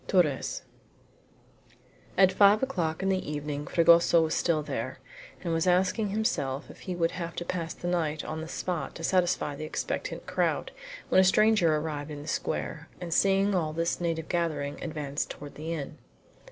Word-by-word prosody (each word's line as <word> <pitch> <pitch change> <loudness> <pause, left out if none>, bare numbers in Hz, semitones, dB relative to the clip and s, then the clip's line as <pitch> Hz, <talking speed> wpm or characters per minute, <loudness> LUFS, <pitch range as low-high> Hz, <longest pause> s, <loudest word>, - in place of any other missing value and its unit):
TORRES 165 -8 +1 1.5
At 190 0 +6
five 200 +4 +5
o'clock 175 -10 -1
in 195 - +1
the 185 -5 -1
evening 145 0 -4
Fragoso 170 0 +5
was 160 - -1
still 160 -3 +1
there, - - -4 0.5
and 170 -2 -1
was 165 +2 +1
asking 185 +4 +2
himself 165 - -1
if - - -15
he 185 - -5
would 165 -1 +1
have 170 -1 -5
to 175 - -4
pass 170 -2 -3
the 175 - -6
night 160 -4 -1
on 160 0 -4
the 160 - -6
spot 165 -3 -3
to 165 - -8
satisfy 175 -5 +1
the 155 - -6
expectant - - -4
crowd, - - 0 0.4
when 185 - +6
a - - +5
stranger 190 -4 +4
arrived 150 -1 -3
in 145 -1 -7
the - - -11
square, 155 0 -3
and 175 -2 -3
seeing 195 +2 +3
all 160 -4 0
this 165 +2 -1
native 165 -2 -1
gathering, 155 -5 -2
advanced 150 -3 -3
toward 145 0 -8
the 160 +2 -6
inn. 150 -4 -5
165 Hz, 175 wpm, -28 LUFS, 155-185 Hz, 1.5 s, At